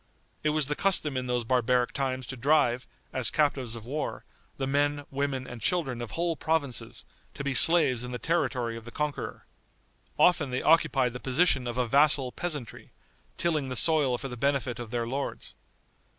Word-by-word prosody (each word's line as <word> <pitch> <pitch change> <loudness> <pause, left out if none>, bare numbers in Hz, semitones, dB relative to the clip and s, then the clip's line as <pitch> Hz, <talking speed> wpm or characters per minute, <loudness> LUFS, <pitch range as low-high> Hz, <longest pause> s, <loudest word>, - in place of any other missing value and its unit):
It 155 - +2
was 150 -1 +1
the 150 +2 -2
custom 170 -7 +1
in 130 0 -2
those 125 -1 -1
barbaric 125 0 +2
times 130 -2 -2
to 130 - -5
drive, 125 -2 +2 0.3
as 130 -3 0
captives 135 -6 0
of 115 -2 -9
war, 145 +5 -4 0.3
the 135 - -2
men, 145 +1 0
women 135 -1 -2
and 120 -3 -9
children 135 -6 0
of 120 - -5
whole 170 -1 0
provinces, 155 -6 -1 0.3
to - - -5
be 140 -1 -1
slaves 140 -6 +5
in 125 - -6
the 125 - -3
territory 125 -6 -1
of 115 -1 -9
the - - -8
conqueror. 150 +3 -4 0.7
Often 160 -6 +4
they 125 +1 -2
occupied 150 -6 +3
the 125 - -6
position 130 -1 +2
of 120 0 -4
a 125 - +2
vassal 140 0 +3
peasantry, 150 -9 -5 0.5
tilling 155 -6 0
the 130 - -3
soil 145 -3 +3
for 135 - -6
the 125 - -7
benefit 135 -1 -1
of 120 -2 -6
their 120 0 -2
lords. 135 +4 -4
135 Hz, 180 wpm, -28 LUFS, 125-150 Hz, 0.7 s, slaves